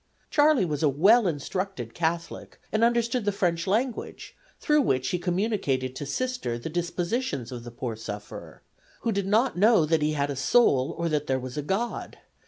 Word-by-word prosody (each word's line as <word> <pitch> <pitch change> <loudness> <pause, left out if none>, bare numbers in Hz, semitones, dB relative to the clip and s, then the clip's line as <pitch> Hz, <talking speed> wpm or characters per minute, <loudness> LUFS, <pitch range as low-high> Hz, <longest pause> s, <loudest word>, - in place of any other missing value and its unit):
Charley 290 -8 +4
was 150 -4 -3
a 155 - +4
well 200 - +5
instructed 155 - -3
Catholic, 170 0 -3
and 220 +1 +1
understood 235 0 +2
the 205 - +1
French 175 -3 -1
language, 230 +5 -2 0.2
through 300 0 +3
which 130 - 0
he 180 - -1
communicated 175 - -1
to 145 - -5
Sister 250 - -2
the 120 - -6
dispositions 175 - -2
of 120 -2 -7
the 120 - -8
poor 120 -1 -5
sufferer, 105 -2 -8 0.4
who 230 - 0
did 200 -2 -1
not 220 0 +2
know 215 -5 +5
that 160 0 +1
he 150 +1 +1
had 145 -1 -1
a - - -4
soul, 135 - +3
or 170 - -1
that 150 -1 -1
there 130 0 +1
was 125 0 -7
a 150 - -2
God. 195 +10 -3
170 Hz, 185 wpm, -26 LUFS, 135-220 Hz, 0.4 s, well